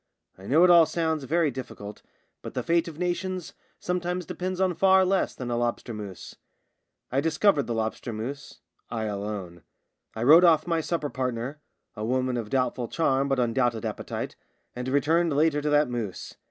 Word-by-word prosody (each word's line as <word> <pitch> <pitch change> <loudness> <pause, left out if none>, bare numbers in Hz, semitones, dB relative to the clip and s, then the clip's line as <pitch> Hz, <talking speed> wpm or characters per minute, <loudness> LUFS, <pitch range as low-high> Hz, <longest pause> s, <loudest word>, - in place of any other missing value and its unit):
I 95 +1 -12
know 155 +6 +5
it 180 - +7
all 170 -2 +7
sounds 160 -2 -1
very 160 +1 +1
difficult, 105 -5 -8 0.4
but - - -8
the - - -1
fate 170 0 +2
of 160 -3 -8
nations 180 0 -3 0.3
sometimes 180 0 -2
depends 185 +2 -4
on 190 -1 +2
far 190 +1 +5
less 190 +1 +1
than 125 -2 -5
a 120 - 0
lobster 120 0 -2
mousse. 100 -4 -8 0.7
I 135 +2 +2
discovered 160 0 +2
the 120 - -2
lobster 110 +2 -3
mousse 125 +7 -7
— - - -44
I 110 - -3
alone. 100 -4 -5 0.5
I 110 - -3
rode 160 +7 +8
off 165 -3 +5
my 165 -2 0
supper 155 -3 -2
partner 130 +3 -3 0.2
— - - -51
a 105 - -5
woman 130 +2 0
of 115 -3 -4
doubtful 125 -1 0
charm 140 -3 +1
but 135 -1 +1
undoubted 120 -2 +1
appetite - - -4 0.2
— - - -46
and 125 +1 -5
returned 155 +4 +2
later 150 0 +2
to 150 - -1
that 150 0 +4
mousse. 115 -6 -5
140 Hz, 185 wpm, -26 LUFS, 120-170 Hz, 0.7 s, rode